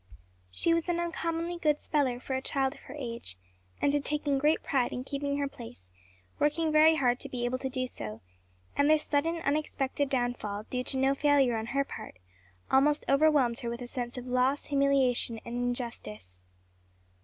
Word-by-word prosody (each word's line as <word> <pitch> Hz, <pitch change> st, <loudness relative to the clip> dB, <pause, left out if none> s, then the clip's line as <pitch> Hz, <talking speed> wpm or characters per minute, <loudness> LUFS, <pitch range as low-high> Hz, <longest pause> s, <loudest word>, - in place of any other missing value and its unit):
She 330 Hz, -, +1 dB
was 335 Hz, +1 st, 0 dB
an 345 Hz, -1 st, +1 dB
uncommonly 335 Hz, 0 st, -2 dB
good 300 Hz, -2 st, +2 dB
speller 270 Hz, -5 st, 0 dB
for 265 Hz, -, -5 dB
a 260 Hz, -, -1 dB
child 270 Hz, 0 st, 0 dB
of -, -, -15 dB
her 270 Hz, -, -9 dB
age, 235 Hz, -, -6 dB, 0.4 s
and 285 Hz, -, +2 dB
had 290 Hz, -1 st, +1 dB
taken 290 Hz, -2 st, 0 dB
great 300 Hz, +3 st, +2 dB
pride 255 Hz, -3 st, +1 dB
in 250 Hz, -, -4 dB
keeping 280 Hz, +1 st, -2 dB
her 285 Hz, -1 st, 0 dB
place, 160 Hz, -, -11 dB, 0.5 s
working 310 Hz, +2 st, +1 dB
very 310 Hz, +1 st, +6 dB
hard 250 Hz, -4 st, +2 dB
to -, -, -6 dB
be 240 Hz, -1 st, -3 dB
able 255 Hz, +1 st, -1 dB
to 265 Hz, -, -3 dB
do 255 Hz, 0 st, -1 dB
so; 110 Hz, -, -7 dB, 0.5 s
and 285 Hz, +1 st, +3 dB
this 310 Hz, -1 st, +4 dB
sudden, 315 Hz, +3 st, +1 dB
unexpected 285 Hz, -1 st, -1 dB
downfall, 245 Hz, -5 st, -1 dB
due 250 Hz, 0 st, -1 dB
to 265 Hz, -, +1 dB
no 265 Hz, +1 st, +3 dB
failure 275 Hz, -4 st, +3 dB
on 220 Hz, 0 st, -3 dB
her 275 Hz, +3 st, +1 dB
part, 90 Hz, -, -9 dB, 0.5 s
almost 290 Hz, +3 st, +3 dB
overwhelmed 275 Hz, -4 st, +3 dB
her 235 Hz, -, -3 dB
with 235 Hz, +1 st, -5 dB
a -, -, -7 dB
sense 245 Hz, 0 st, -5 dB
of 250 Hz, -, -6 dB
loss, 255 Hz, +3 st, +1 dB
humiliation 275 Hz, -5 st, +2 dB
and 235 Hz, -, -6 dB
injustice. 230 Hz, -, -4 dB
270 Hz, 185 wpm, -29 LUFS, 245-295 Hz, 0.5 s, very